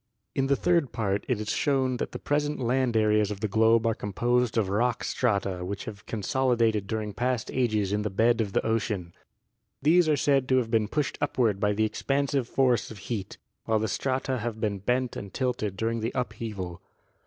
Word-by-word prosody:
In 135 0 0
the 140 - +3
third 170 -3 +2
part 100 -3 -1
it 125 -4 0
is 105 0 -2
shown 130 -3 +1
that - - -3
the - - -5
present 145 +1 -1
land 125 -1 +1
areas 105 -1 +3
of 105 -2 -5
the 110 - +1
globe 110 +2 +3
are 115 - +3
composed 120 +3 0
of 110 -4 +2
rock 115 +5 0
strata 100 -6 0
which 100 +2 -5
have 100 -2 -9
con 110 -3 -4
solidated 115 -4 +1
during 110 -1 -3
past 125 +2 -1
ages 110 -6 +1
in 105 - +1
the 105 - -1
bed 115 +4 +2
of 100 -3 -3
the - - +1
ocean. 105 -6 -1 0.7
These 160 +3 +4
are 150 - +3
said 135 -2 +2
to 130 - +4
have 115 -3 0
been 110 -2 +2
pushed 145 +4 -2
upward 110 -6 +1
by 105 0 +2
the 110 +2 +1
expansive 135 +2 -1
force 125 -3 +2
of 110 - -9
heat, 100 -1 -5 0.3
while 110 - +2
the 110 +1 0
strata 130 +1 -1
have 110 0 -4
been 105 -3 -1
bent 125 +4 0
and 100 - -7
tilted 120 -7 -2
during 115 +2 -1
the 115 +2 -2
upheaval. 110 -7 -4
115 Hz, 200 wpm, -27 LUFS, 105-130 Hz, 0.7 s, These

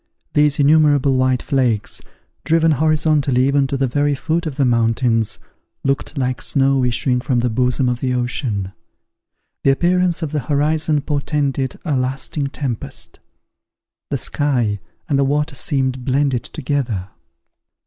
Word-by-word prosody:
These 150 0 +3
innumerable 145 -2 +4
white 130 -1 +1
flakes, 120 -6 0 0.4
driven 165 0 +3
horizontally 150 -3 +2
even 140 0 +2
to 135 - -2
the 135 - +1
very 145 +3 +1
foot 165 +4 -2
of 145 - -5
the 140 - +2
mountains, 115 -2 +1 0.5
looked 140 +2 -2
like 125 -3 -1
snow 135 -1 +2
issuing 125 +1 +2
from 125 -3 0
the 120 -1 0
bosom 125 +2 +1
of 120 -1 -1
the 130 -1 -1
ocean. 120 -6 -2 0.9
The - - +4
appearance 175 +4 +2
of 150 - -3
the 150 - -1
horizon 150 +2 +1
portended 140 -2 -2
a 150 -4 0
lasting 135 +3 -1
tempest; 135 -5 -5 0.9
the - - -1
sky 120 -8 0 0.3
and 140 -4 +1
the - - +4
water 150 +2 0
seemed 130 -2 0
blended 135 -1 0
together. 125 -10 -3
135 Hz, 140 wpm, -19 LUFS, 125-145 Hz, 0.9 s, innumerable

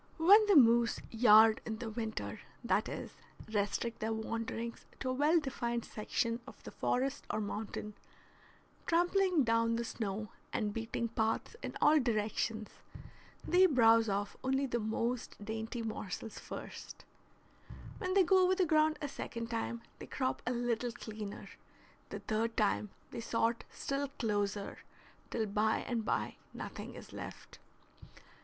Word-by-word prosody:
When 395 +7 +8
the 405 - +5
moose 235 -3 +6
yard 220 -1 +7
in 220 -1 -4
the 225 0 -5
winter, 220 -1 -4 0.2
that - - +1
is, - - -5 0.4
restrict 210 +3 -1
their 220 +1 -1
wanderings 230 +1 -3 0.2
to 255 - -1
a - - 0
well 300 +5 +4
defined 240 -5 -2
section 230 +2 -1
of - - -13
the - - -8
forest 270 +2 -1
or - - -1
mountain, 210 0 -4 0.9
trampling 355 -1 +3
down 230 0 +2
the 235 0 -2
snow 215 -2 -3 0.2
and 210 -2 -1
beating 225 +1 -2
paths 225 - -1
in - - -5
all 310 +1 +6
directions, 220 -2 -1 0.8
they 370 +1 +6
browse 230 - +5
off 200 +1 -1
only 265 +1 +1
the 240 -2 -1
most 230 +2 -2
dainty 225 +2 -4
morsels 220 0 -5
first; - - -8 0.9
when 370 +1 -1
they 390 - +7
go 375 +1 +5
over 370 +1 +4
the 370 -1 +3
ground 310 -1 +3
a - - 0
second 230 -4 -5
time 235 0 -3 0.2
they - - -8
crop 255 -2 -1
a - - +2
little 240 0 -1
cleaner; 215 -3 -7 0.6
the - - -6
third 225 +1 -1
time 210 -1 +1 0.2
they 235 - -5
sort 230 0 0
still 275 +1 -2
closer, 205 -6 -2 0.5
till 225 -2 -1
by 215 +2 +1
and 235 -3 -2
by - - -1 0.2
nothing - - -7
is - - -11
left. - - -9
230 Hz, 145 wpm, -34 LUFS, 220-265 Hz, 0.9 s, When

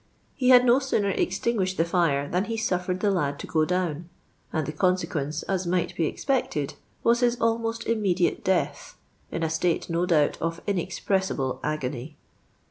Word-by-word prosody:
lie 250 - +3
had 250 -1 +8
no 245 +2 +5
sooner 215 -7 0
extinguished 190 0 0
the 165 - +3
fire 165 -5 +1
than 180 +5 0
he 230 0 -3
suffered 180 -4 -1
the 205 - +3
lad 145 -7 0
to - - -7
go 155 -1 +1
down; 175 -2 -2 0.4
and 155 -2 -1
the 150 - -3
consequence, 155 -3 -1
as 190 -2 -2
might 175 0 0
be 160 -3 0
espectrd, 245 - -1 0.3
was 235 +1 +4
his 245 -1 +2
almost 230 0 0
immediate 195 -6 +1
death, 190 -2 -1 0.3
in 165 - -3
a - - +2
state, 165 +1 0
no 170 +2 +1
doubt, 155 -5 +2
of 165 0 -2
tncxpresiiblc 190 -6 -1
agony. 145 -1 -3
180 Hz, 165 wpm, -26 LUFS, 160-210 Hz, 0.4 s, had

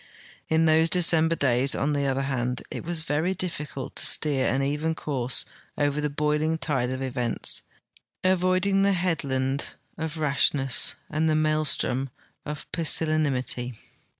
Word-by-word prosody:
In 160 +1 +3
those 160 +1 +4
Decemljer 165 -1 +3
days, 130 0 +3
on 150 +2 0
tlie 140 -1 0
other 135 +1 0
hand, 125 -2 -2
it - - -5
was 170 -1 -2
very 160 +4 -1
diflicult 150 -6 -5
to - - 0
steer 140 -4 +2
an 135 +3 +1
even 150 +3 -1
course 130 -5 0 0.3
over 145 0 +1
the 150 - 0
boiling 150 +2 0
tide 130 -4 -1
of 130 +1 -3
events, 125 -3 -1 0.6
avoiding 185 +1 +2
the 200 0 +3
headland 140 -7 -1 0.2
of 160 0 -4
Rashness 140 -3 +2
and 155 +1 0
the 155 - +2
maelstrom 155 -4 +1 0.4
of 150 -1 -5
Pusillanimity. 145 -7 0
150 Hz, 140 wpm, -26 LUFS, 135-160 Hz, 0.6 s, those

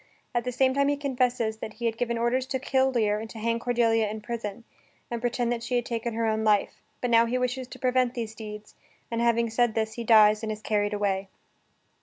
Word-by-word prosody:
At 240 0 0
the 250 - -1
same 260 +1 +2
time 280 +1 +2
he 285 0 +1
confesses 250 -5 0
that 220 0 -7
he 235 +2 -6
had 225 -1 +1
given 235 0 -1
orders 245 +3 0
to 265 - -1
kill 265 0 +2
Lear 210 -4 +1
and 220 +1 -7
to 225 - -10
hang 230 +1 0
Cordelia 230 -3 +2
in 215 +1 -5
prison, 215 0 -5 0.5
and 235 -1 -3
pretend 245 0 0
that 235 -1 -2
she 235 +2 -2
had 240 -1 +1
taken 230 -1 -3
her 230 0 0
own 220 0 0
life; 210 -2 +1 0.2
but 245 - -1
now 230 0 +5
he 250 +2 0
wishes 250 0 -2
to 260 - -10
prevent 255 -1 +1
these 225 -3 -4
deeds, 210 -1 -9 0.4
and 230 0 -1
having 235 -1 +2
said 240 -1 +2
this 220 -1 -1
he 235 - -5
dies, 215 -2 +6
and 220 -1 -3
is 215 0 -6
carried 205 -1 0
away. 195 -1 -1
230 Hz, 235 wpm, -27 LUFS, 220-245 Hz, 0.5 s, dies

